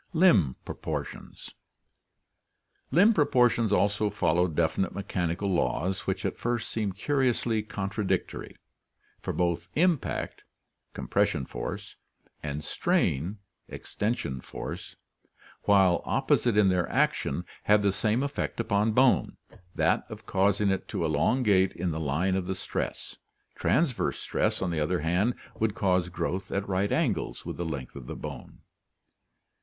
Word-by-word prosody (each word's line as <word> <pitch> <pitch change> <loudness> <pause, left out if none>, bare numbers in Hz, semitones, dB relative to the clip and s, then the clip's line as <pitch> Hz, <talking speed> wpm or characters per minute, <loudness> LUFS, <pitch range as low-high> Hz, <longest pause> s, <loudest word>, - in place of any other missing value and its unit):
Limb 110 - +4
Proportions. - - -6 0.7
— - - -45
Limb 205 +5 +7
proportions 125 - +3
also 105 +1 +2
follow 90 -3 +2
definite 85 +3 0
me 100 - -3
chanical 95 +1 -1
laws 85 +5 0
which 95 -1 -1
at - - -2
first 120 -1 -2
seem 105 -3 -1
curiously 120 0 +1
contradictory, 105 -1 -3 0.7
for - - -3
both 85 0 -1
impact 170 -3 0 0.5
(compression 65 - 0
force) - - -6 0.4
and 75 0 -4
strain 80 +6 0 0.3
(extension 100 - -3
force), - - -7 0.7
while 95 -3 +5
opposite 130 -5 +1
in 105 -2 +5
their 90 -2 +1
action, 85 +6 0 0.2
have 105 0 +4
the 100 - +3
same 110 +6 +1
effect 140 -3 -3
upon 110 -1 +1
bone, 130 +2 +3 0.4
that - - +1
of - - -9
causing 100 +1 +2
it 95 - -2
to - - -2
elongate 95 - +2
in 90 0 -2
the 80 - -3
line 80 +5 0
of 95 -2 -2
the 95 - -1
stress. - - -4 0.4
Transverse 150 -7 +1
stress, - - 0
on 90 - -1
the 80 - -1
other 80 +3 0
hand, 90 +9 +1 0.2
would 110 -2 +1
cause 90 -3 +1
growth 90 +1 -3
at 100 0 -2
right 100 +1 0
angles 140 - -1
with - - -5
the 85 - -3
length 70 -6 -5
of 65 -3 -9
the - - -5
bone. - - -8
100 Hz, 135 wpm, -28 LUFS, 85-110 Hz, 0.7 s, Limb